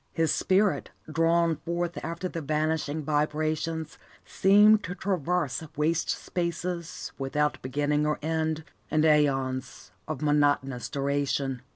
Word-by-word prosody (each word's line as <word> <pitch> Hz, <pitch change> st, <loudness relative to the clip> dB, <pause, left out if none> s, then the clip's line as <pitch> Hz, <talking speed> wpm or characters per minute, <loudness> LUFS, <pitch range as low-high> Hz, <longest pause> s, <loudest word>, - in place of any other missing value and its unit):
His 165 Hz, -2 st, +2 dB
spirit, 195 Hz, +1 st, +2 dB, 0.2 s
drawn 165 Hz, 0 st, +2 dB
forth 170 Hz, 0 st, -3 dB
after 170 Hz, +3 st, -3 dB
the 170 Hz, -2 st, -5 dB
vanishing 155 Hz, 0 st, -1 dB
vibrations, 155 Hz, +2 st, -1 dB, 0.3 s
seemed 210 Hz, +2 st, +5 dB
to 180 Hz, -, -5 dB
traverse 180 Hz, -7 st, -1 dB
waste 160 Hz, +2 st, 0 dB
spaces 170 Hz, -1 st, -3 dB
without 150 Hz, +2 st, 0 dB
beginning 145 Hz, +3 st, 0 dB
or 150 Hz, -, 0 dB
ending, 160 Hz, 0 st, -1 dB, 0.3 s
and 155 Hz, 0 st, +2 dB
aeons 135 Hz, -4 st, +1 dB, 0.2 s
of 135 Hz, -, -4 dB
monotonous 145 Hz, -5 st, +1 dB
duration. 140 Hz, -2 st, -1 dB
155 Hz, 110 wpm, -27 LUFS, 145-170 Hz, 0.3 s, seemed